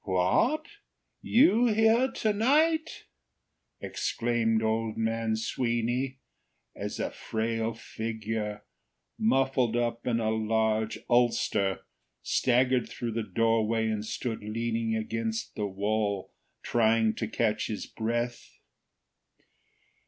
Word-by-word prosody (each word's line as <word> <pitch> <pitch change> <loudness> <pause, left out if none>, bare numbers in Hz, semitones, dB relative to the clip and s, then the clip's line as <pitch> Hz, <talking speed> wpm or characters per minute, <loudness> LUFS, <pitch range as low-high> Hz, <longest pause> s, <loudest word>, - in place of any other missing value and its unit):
"What! 95 - +2 0.6
You 245 -2 +4
here 225 +3 +4
to 215 -1 0
night!" 310 +9 +2 0.8
exclaimed 115 -2 0
old 110 0 -1
man 115 0 0
Sweeny, 120 +3 -1 0.6
as - - -5
a - - -2
frail 115 0 -2
figure, 110 -2 -4 0.6
muffled 135 - +2
up 120 0 -2
in 115 -2 +1
a 110 -1 0
huge 110 0 0
ulster, 115 -5 +2 0.4
staggered 125 0 +2
through 120 -1 -4
the 115 +1 -2
doorway 110 +2 +1
and 105 -1 -2
stood 110 +1 -4
leaning 115 +1 -2
against 110 0 -3
the 105 -1 -2
wall, 100 0 -1 0.3
trying 115 -1 +3
to 110 - -2
catch 110 -1 0
his 105 - -4
breath. 120 +2 -3
115 Hz, 100 wpm, -28 LUFS, 110-120 Hz, 0.8 s, You